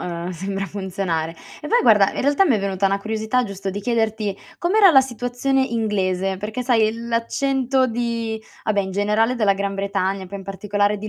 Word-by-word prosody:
uhm, 170 Hz, 0 st, -4 dB
sembra 195 Hz, +3 st, -4 dB
funzionare. 190 Hz, -5 st, -3 dB, 0.3 s
E 300 Hz, -, -6 dB
poi 480 Hz, -, +4 dB
guarda, 210 Hz, -4 st, +5 dB
in -, -, -2 dB
realtà 285 Hz, +7 st, +3 dB
mi 270 Hz, -, +4 dB
è -, -, -1 dB
venuta 195 Hz, 0 st, 0 dB
una 195 Hz, +1 st, +1 dB
curiosità 220 Hz, +4 st, -1 dB
giusto 195 Hz, -1 st, -6 dB
di 205 Hz, +2 st, -5 dB
chiederti: 220 Hz, -3 st, -1 dB, 0.2 s
com'era 385 Hz, +2 st, +5 dB
la 270 Hz, -, +7 dB
situazione 245 Hz, +2 st, -1 dB
inglese? 195 Hz, -5 st, -1 dB
Perché 215 Hz, +5 st, -4 dB
sai, 225 Hz, -4 st, +3 dB
l'accento 255 Hz, +3 st, 0 dB
di 230 Hz, -2 st, -2 dB, 0.2 s
ah 215 Hz, -, +1 dB
beh, 200 Hz, -, +2 dB
in 190 Hz, -, -5 dB
generale 210 Hz, +4 st, +1 dB
della 210 Hz, -5 st, +3 dB
Gran 200 Hz, 0 st, -2 dB
Bretagna, 195 Hz, -1 st, -2 dB
poi 200 Hz, +2 st, -7 dB
in 195 Hz, -, -10 dB
particolare 205 Hz, +1 st, 0 dB
di 215 Hz, +1 st, -6 dB
210 Hz, 190 wpm, -21 LUFS, 195-240 Hz, 0.3 s, la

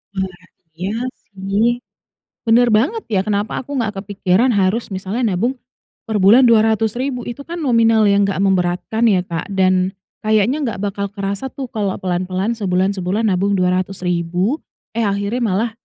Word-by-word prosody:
Wah 190 Hz, -2 st, -4 dB, 0.4 s
iya 185 Hz, +4 st, -3 dB, 0.4 s
sih, 195 Hz, +4 st, +1 dB, 0.8 s
bener 235 Hz, +2 st, +5 dB
banget 410 Hz, -, 0 dB
ya 190 Hz, -, +3 dB
kenapa 205 Hz, 0 st, -1 dB
aku 270 Hz, -, -12 dB
nggak 220 Hz, -4 st, -1 dB
kepikiran 200 Hz, +3 st, +1 dB
harus 195 Hz, +5 st, +1 dB
misalnya 195 Hz, +6 st, -3 dB
nabung, 235 Hz, +8 st, +1 dB, 0.6 s
per 220 Hz, -, 0 dB
bulan 220 Hz, +7 st, +7 dB
Rp200.000, 225 Hz, +3 st, +2 dB
Itu 260 Hz, +4 st, -7 dB
kan 340 Hz, +1 st, -5 dB
nominal 230 Hz, -5 st, +3 dB
yang 200 Hz, 0 st, +4 dB
enggak 195 Hz, -1 st, -1 dB
memberatkan 185 Hz, +3 st, 0 dB
ya 185 Hz, -, +3 dB
Kak 165 Hz, -1 st, -3 dB
dan, 185 Hz, -1 st, +2 dB, 0.3 s
kayaknya 215 Hz, +4 st, +2 dB
nggak 225 Hz, -6 st, -3 dB
bakal 200 Hz, 0 st, -2 dB
kerasa 200 Hz, +5 st, -4 dB
tuh 270 Hz, 0 st, -6 dB
kalau 205 Hz, -3 st, -1 dB
pelan-pelan 185 Hz, +4 st, -1 dB
sebulan-sebulan 195 Hz, 0 st, 0 dB
nabung 200 Hz, 0 st, +1 dB
Rp200.000 180 Hz, -, 0 dB, 0.3 s
eh, 230 Hz, -, 0 dB
akhirnya 200 Hz, +3 st, -1 dB
malah, 220 Hz, +1 st, +1 dB
200 Hz, 145 wpm, -19 LUFS, 185-230 Hz, 0.8 s, bulan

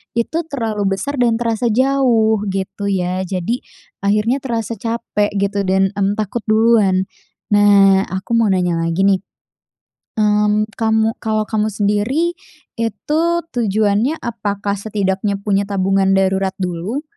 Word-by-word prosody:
itu 235 Hz, +8 st, -1 dB
terlalu 215 Hz, -8 st, -1 dB
besar 280 Hz, +6 st, -4 dB
dan 235 Hz, -2 st, +3 dB
terasa 230 Hz, 0 st, -1 dB
jauh 235 Hz, -3 st, +2 dB
gitu 195 Hz, +1 st, -3 dB
ya. 185 Hz, -1 st, -1 dB
Jadi, 190 Hz, +7 st, -2 dB, 0.4 s
akhirnya 210 Hz, +6 st, +1 dB
terasa 230 Hz, -4 st, -4 dB
capek 225 Hz, -3 st, -2 dB
gitu 200 Hz, 0 st, -1 dB
dan, 190 Hz, 0 st, +2 dB
mmm, 200 Hz, +1 st, +1 dB
takut 215 Hz, +2 st, -2 dB
duluan. 215 Hz, -4 st, +3 dB, 0.5 s
Nah, 200 Hz, -2 st, +5 dB
aku 190 Hz, +5 st, -6 dB
mau 230 Hz, -1 st, +3 dB
nanya 180 Hz, -3 st, +1 dB
lagi 170 Hz, +4 st, 0 dB
nih. 195 Hz, -1 st, +3 dB, 1.0 s
Mmm, 210 Hz, 0 st, +2 dB
kamu 220 Hz, 0 st, +1 dB
kalau 215 Hz, -1 st, -1 dB
kamu 215 Hz, -1 st, +1 dB
sendiri 215 Hz, -, 0 dB, 0.5 s
itu 230 Hz, +7 st, -1 dB, 0.3 s
tujuannya 220 Hz, +5 st, +1 dB
apakah 205 Hz, -3 st, -3 dB
setidaknya 200 Hz, -1 st, -1 dB
punya 200 Hz, -1 st, 0 dB
tabungan 195 Hz, -1 st, +1 dB
darurat 190 Hz, 0 st, +1 dB
dulu 180 Hz, -, -3 dB
210 Hz, 125 wpm, -18 LUFS, 195-230 Hz, 1.0 s, Nah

